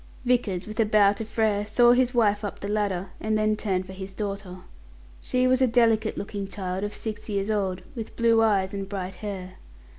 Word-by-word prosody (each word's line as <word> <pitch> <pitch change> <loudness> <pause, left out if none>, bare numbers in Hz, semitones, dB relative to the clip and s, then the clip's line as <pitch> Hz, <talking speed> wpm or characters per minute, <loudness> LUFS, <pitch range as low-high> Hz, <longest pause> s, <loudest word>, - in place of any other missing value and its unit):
Vickers, 230 -7 +1
with 215 +2 -8
a 225 - +5
bow 210 -2 +5
to 205 +2 -4
Frere, 215 -2 0
saw 240 +3 +5
his 250 0 +3
wife 215 -4 +2
up 205 - -5
the 200 - -5
ladder, 200 -3 -1
and 215 0 0
then 215 0 +2
turned 190 -4 -1
for 190 - -9
his 190 0 -7
daughter. 195 -2 -5 0.6
She 255 0 +1
was 255 +1 +3
a 260 - +5
delicate 230 -2 +2
looking 200 -1 -4
child 190 -1 -4
of 205 - -2
six 220 0 -5
years 200 +1 -1
old, 190 -3 -1
with 225 -3 -7
blue 230 -1 +4
eyes 200 -4 +2
and 195 -1 -4
bright 190 -2 -4
hair. 185 -1 -7
205 Hz, 205 wpm, -26 LUFS, 195-225 Hz, 0.6 s, a